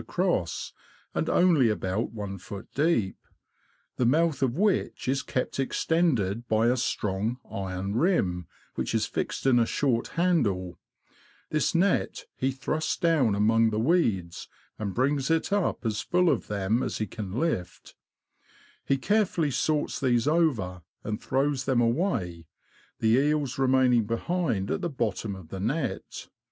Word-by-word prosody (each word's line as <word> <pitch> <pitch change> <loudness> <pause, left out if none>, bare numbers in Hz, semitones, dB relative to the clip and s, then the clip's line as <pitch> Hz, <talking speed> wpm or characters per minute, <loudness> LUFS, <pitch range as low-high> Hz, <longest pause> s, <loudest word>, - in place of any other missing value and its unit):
across, 175 - -1 0.4
and - - -1
only 165 -9 +4
about 105 +1 -1
I 105 - -3
ft. 100 +2 -8
deep, 140 - +1 0.8
the 125 - +1
mouth 155 +2 +2
of 130 0 +1
which 205 -7 0
is 135 +1 +1
kept 125 +1 -3
extended 125 - 0
by 110 +2 +3
a 125 - +3
strong 110 -2 -1
iron 95 +1 -3
rim, 100 - +1 0.3
which - - -2
is - - +2
fixed - - -3
in 130 -2 +5
a 115 - +2
short 125 -5 0
handle 105 - +1 0.7
This 155 +2 +1
net 200 - +1
he 130 - 0
thrusts 145 +4 -2
down 150 -11 +2
among 110 +2 +3
the 105 - -2
weeds, 110 - 0 0.3
and 100 -3 -3
brings 135 +2 +1
it 165 +4 +1
up 200 -10 0
as 105 -2 -1
full 180 -1 +2
of - - -2
them 105 +3 0
as 130 - -2
he 110 - -1
can 100 -1 -7
lift; 120 - -3 0.9
he 135 - +1
care 210 +8 +2
fully 160 -5 -1
sorts 150 +3 0
these 125 -1 +2
over, 125 - +1 0.2
and 105 +1 -4
throws 135 0 0
them 130 -3 +2
away, 115 - 0 0.5
the 110 +2 +3
eels 145 -2 0
remaining 130 -3 +3
behind 115 - -1
at - - -1
the 175 - -1
bottom 110 -6 -2
of 90 -4 -12
the 95 - -6
net. 135 - -3
125 Hz, 150 wpm, -27 LUFS, 105-155 Hz, 0.9 s, in